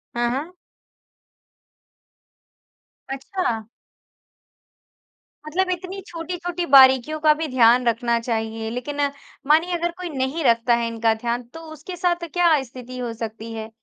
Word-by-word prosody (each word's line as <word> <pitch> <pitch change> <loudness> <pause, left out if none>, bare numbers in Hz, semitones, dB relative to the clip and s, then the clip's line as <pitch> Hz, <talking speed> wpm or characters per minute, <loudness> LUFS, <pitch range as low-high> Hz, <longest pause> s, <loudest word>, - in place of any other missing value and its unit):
हाँ, 240 0 +1
हाँ। 295 +8 -4 2.6
अच्छा। 270 - -2 1.8
मतलब 370 +4 0
इतनी 370 +2 -5
छोटी-छोटी 350 +1 -4
बारीकियों 265 +3 +7
का 305 0 +5
भी 320 - -1
ध्यान 245 -1 +4
रखना 235 0 +1
चाहिए। 225 -1 -3
लेकिन, 270 +5 -4 0.5
मानिए 325 +4 +4
अगर 345 0 -1
कोई 360 -2 -5
नहीं 275 +3 -2
रखता 235 -1 +3
है 230 - -1
इनका 230 -1 +1
ध्यान, 235 +2 -3
तो 250 +8 -12
उसके 315 +4 -8
साथ 345 -1 0
क्या 340 -5 +4
स्थिति 255 0 -10
हो 240 -2 -4
सकती 225 0 -6
है? 220 0 -6
260 Hz, 125 wpm, -22 LUFS, 235-335 Hz, 2.6 s, बारीकियों